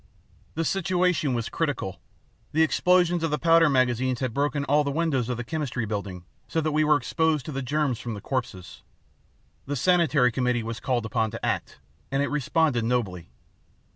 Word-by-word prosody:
"The 165 +1 -1
situation 180 -7 +1
was 115 -2 -2
critical. 145 - -3 0.5
The 160 +2 +4
explosions 175 +1 +3
of 165 - 0
the 150 - 0
powder 165 -1 +5
magazines 130 -1 +1
had 130 -4 -2
broken 145 +1 0
all 145 +2 +3
the 140 - -2
windows 140 -5 0
of 125 - -2
the 120 - -4
Chemistry 130 -4 -3
Building, 100 -4 -5 0.2
so 165 - -1
that 155 -1 0
we 155 +1 +2
were 150 -1 +4
exposed 155 +1 0
to - - -5
the 135 -1 -3
germs 140 -2 -1
from 120 -3 -5
the - - -6
corpses. 100 -7 -5 0.9
The 145 - -2
sanitary 155 -4 +3
committee 125 -1 0
was 115 0 -5
called 120 -1 -1
upon 110 0 0
to - - -6
act, - - -2 0.3
and 135 +1 +1
it - - -2
responded 150 -3 +1
nobly. 105 -8 -2
135 Hz, 180 wpm, -26 LUFS, 120-155 Hz, 0.9 s, powder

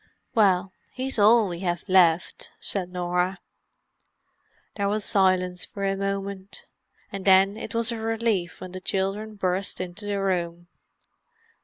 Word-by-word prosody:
"Well, 190 -4 +3 0.2
he's 260 -2 -3
all 215 +1 +6
we 175 -2 -5
have 175 -2 -2
left," 180 -3 +2
said 185 -3 -2
Norah. 180 +1 -1 1.4
There 200 -1 0
was 210 0 -1
silence 185 -3 +2
for 200 -1 -5
a 195 0 +1
moment; 195 0 -4 0.5
and 195 -1 -5
then 195 +1 +5
it 225 - -7
was 230 0 +2
a 230 - -4
relief 225 -5 -1
when 185 - -8
the 185 0 -7
children 195 +3 -2
burst 185 0 -2
into 185 +3 -6
the 200 -1 -1
room. 175 -3 -2
195 Hz, 140 wpm, -25 LUFS, 180-205 Hz, 1.4 s, all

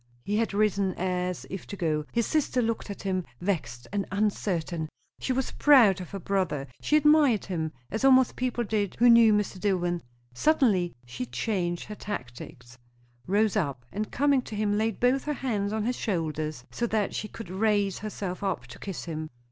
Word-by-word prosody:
He 205 - -1
had 225 0 +1
risen, 200 -2 +1
as 180 -1 -2
if 195 - -6
to - - -6
go. 155 -4 0
His 235 -1 +1
sister 300 -5 +1
looked 230 -2 -1
at 200 - -7
him, 185 -2 0 0.2
vexed 125 -11 -3
and 200 -2 -1
uncertain. 180 -5 -1 0.3
She - - -2
was 260 0 -1
proud 230 -10 +6
of 180 - -8
her 200 - -5
brother, 185 -7 -1 0.2
she 300 - +3
admired 300 -7 +4
him, 160 -4 -2 0.2
as 225 - -2
almost 260 -2 +5
people 250 -1 -1
did 205 -3 -1
who 240 +1 +7
knew 230 -1 +7
Mr. 210 -2 0
Dillwyn. 175 -3 0 0.3
Suddenly 205 - +2
she 120 0 -5
changed 175 - -2
her 215 - -8
tactics; 125 - -8 0.5
rose 210 +3 +2
up, 140 - -1
and 210 +1 -3
coming 280 0 +3
to 220 - -8
him 205 -1 +1
laid 220 0 0
both 255 +2 +2
her 300 - 0
hands 210 -8 -1
on 215 0 -1
his 245 +1 -1
shoulders 155 - -2
so 235 - -1
that 215 -2 0
she 215 - -3
could 210 -4 -9
raise 205 -1 +1
herself 200 -3 -5
up 185 -11 -1
to 120 - -12
kiss 195 -4 -6
him. 155 -2 -5
200 Hz, 185 wpm, -27 LUFS, 175-225 Hz, 0.5 s, who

